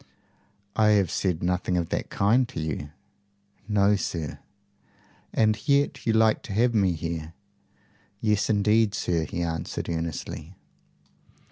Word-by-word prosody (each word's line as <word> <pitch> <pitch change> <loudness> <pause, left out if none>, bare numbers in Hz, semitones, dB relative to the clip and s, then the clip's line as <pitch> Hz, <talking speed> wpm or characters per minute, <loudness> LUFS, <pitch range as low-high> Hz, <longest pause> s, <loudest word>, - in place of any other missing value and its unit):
"I 110 -1 +4
have 100 -5 +2
said 90 -4 -1
nothing 90 0 0
of 85 -2 -1
that - - -2
kind 115 +5 +2
to 135 - -6
you." 75 -2 -3 0.8
"No, 105 -1 +3
sir." 80 -7 -4 0.9
"And 110 -1 +3
yet 140 -2 +1
you 115 - +3
like 110 0 +3
to 105 - -7
have 120 +4 +3
me 95 -5 +3
here?" 80 0 -5 0.8
"Yes, 105 -2 +1
indeed, 105 0 +3
sir," 85 -7 0
he 85 - -3
answered, 80 0 -3
earnestly. 80 +1 -4
95 Hz, 130 wpm, -26 LUFS, 85-110 Hz, 0.9 s, I